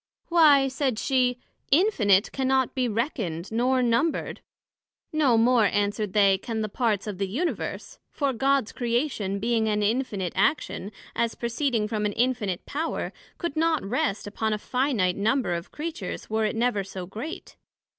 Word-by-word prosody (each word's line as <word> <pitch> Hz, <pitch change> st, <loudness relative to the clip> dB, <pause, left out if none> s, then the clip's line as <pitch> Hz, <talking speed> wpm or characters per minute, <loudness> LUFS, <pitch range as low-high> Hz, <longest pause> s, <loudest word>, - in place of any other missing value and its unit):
Why, 300 Hz, -5 st, +6 dB
said 265 Hz, -3 st, -1 dB
she, 250 Hz, -1 st, +1 dB, 0.3 s
Infinite 235 Hz, -, +3 dB
cannot 265 Hz, -1 st, +1 dB
be 255 Hz, -2 st, 0 dB
reckoned, 215 Hz, -, -2 dB
nor 250 Hz, +3 st, +2 dB
numbred. 240 Hz, +7 st, 0 dB, 0.7 s
No 280 Hz, -7 st, +3 dB
more, 235 Hz, 0 st, +4 dB
answered 205 Hz, 0 st, 0 dB
they, 200 Hz, -2 st, +4 dB
can 225 Hz, +1 st, -3 dB
the 215 Hz, -, -2 dB
parts 215 Hz, -3 st, 0 dB
of 205 Hz, -3 st, -5 dB
the 195 Hz, -, 0 dB
Universe; 295 Hz, -, -3 dB
for 280 Hz, -2 st, -1 dB
God's 270 Hz, -1 st, +1 dB
Creation, 235 Hz, -5 st, -1 dB
being 225 Hz, +1 st, +1 dB
an 210 Hz, -1 st, +1 dB
Infinite 205 Hz, -5 st, -1 dB
action, 200 Hz, -1 st, 0 dB, 0.2 s
as 230 Hz, -1 st, 0 dB
proceeding 235 Hz, -2 st, -1 dB
from 210 Hz, -1 st, -1 dB
an 205 Hz, -, -3 dB
Infinite 225 Hz, -6 st, -1 dB
Power, 315 Hz, +3 st, -3 dB, 0.2 s
could 340 Hz, -5 st, -3 dB
not 320 Hz, -5 st, +1 dB
rest 200 Hz, -2 st, -1 dB
upon 215 Hz, +1 st, -2 dB
a -, -, 0 dB
finite 235 Hz, -6 st, 0 dB
Number 225 Hz, 0 st, +1 dB
of 170 Hz, 0 st, -4 dB
Creatures, 325 Hz, -, -6 dB
were 220 Hz, 0 st, +1 dB
it 215 Hz, -, -1 dB
never 230 Hz, -3 st, +1 dB
so 190 Hz, -1 st, -7 dB
great. 225 Hz, -, -7 dB
230 Hz, 155 wpm, -26 LUFS, 205-265 Hz, 0.7 s, Why